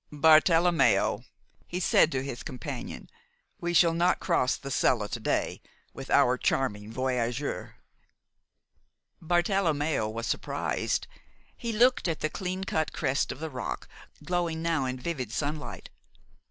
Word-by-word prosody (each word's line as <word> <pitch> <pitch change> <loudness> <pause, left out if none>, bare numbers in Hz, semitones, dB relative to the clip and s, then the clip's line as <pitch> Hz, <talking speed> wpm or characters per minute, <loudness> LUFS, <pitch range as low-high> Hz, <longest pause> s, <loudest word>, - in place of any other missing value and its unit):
"Bartelommeo," 160 +3 +4 0.4
he 180 - -3
said 170 -2 +4
to 130 -2 -1
his 135 -3 -5
companion, 130 -5 -6 0.5
"we 175 - -2
shall 170 -1 +5
not 175 +2 +2
cross 165 -8 +1
the 135 - -7
Sella 115 -4 +2
to 115 - -4
day 110 - -1 0.3
with - - -9
our 125 0 +4
charming 105 -5 -1
voyageur." 125 +1 -2 1.5
Bartelommeo 160 - +1
was 115 +1 -4
surprised. - - -1 0.5
He 235 - -4
looked 240 0 +3
at 165 -2 -2
the 155 - -1
clean 185 0 -3
cut 160 -5 -1
crest 135 +2 0
of - - -8
the 160 0 -5
rock, 125 -2 -5 0.4
glowing 170 -2 -1
now 165 -5 +1
in 130 0 -3
vivid 130 -6 -4
sunlight. 150 +3 -4
155 Hz, 130 wpm, -28 LUFS, 130-175 Hz, 1.5 s, shall